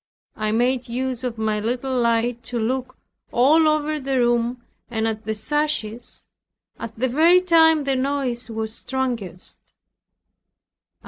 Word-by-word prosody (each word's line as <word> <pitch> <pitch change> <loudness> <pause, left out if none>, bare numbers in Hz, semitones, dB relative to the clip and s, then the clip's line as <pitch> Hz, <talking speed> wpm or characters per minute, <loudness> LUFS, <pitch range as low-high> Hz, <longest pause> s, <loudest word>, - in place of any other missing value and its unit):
I 215 0 -1
made 245 +2 +1
use 255 +1 -3
of 245 -2 -3
my 215 -1 0
little 250 +4 -2
light 235 0 +1
to 245 - -3
look 255 +2 -2 0.3
all 310 +6 +4
over 305 0 +1
the 270 -1 -1
room 240 0 +1 0.2
and 225 -1 -1
at 220 0 -4
the 220 - -2
sashes, 245 -2 -2 0.5
at 230 -1 -7
the 255 +3 +1
very 325 +8 +5
time 320 -4 +4
the 275 -1 0
noise 260 -3 -1
was 220 -1 -4
strongest. 235 -11 -4
245 Hz, 135 wpm, -22 LUFS, 225-275 Hz, 0.5 s, very